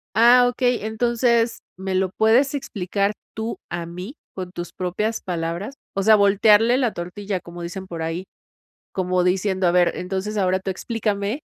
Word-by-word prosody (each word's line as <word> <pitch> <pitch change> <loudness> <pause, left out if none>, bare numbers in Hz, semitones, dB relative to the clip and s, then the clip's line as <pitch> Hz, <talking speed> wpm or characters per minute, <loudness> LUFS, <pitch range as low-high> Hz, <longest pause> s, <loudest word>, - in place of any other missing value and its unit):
Ah, 245 +2 +7
okey. 245 -2 0
Entonces, 235 +1 +1 0.2
¿me 190 0 -3
lo 190 0 +2
puedes 240 +6 +4
explicar 200 -5 -1 0.2
tú 220 +1 -3
a 175 -1 -4
mí 180 - -8 0.2
con 185 -2 -6
tus 175 -1 -6
propias 210 +5 -2
palabras?". 175 +7 -3 0.2
O 195 - +1
sea, 220 +2 +7
voltearle 210 +3 +5
la 245 -4 +1
tortilla, 185 +2 -4
como 175 0 -10
dicen 185 +3 -6
por 170 -3 -6
ahí, 165 +3 -3 0.7
como 185 -1 0
diciendo: 190 0 +1
"A - - +4
ver, 175 -1 +3
entonces, 190 +3 -3
ahora 190 -1 +2
tú 190 0 -3
explícame, 210 +4 -2
195 Hz, 160 wpm, -22 LUFS, 180-225 Hz, 0.7 s, Ah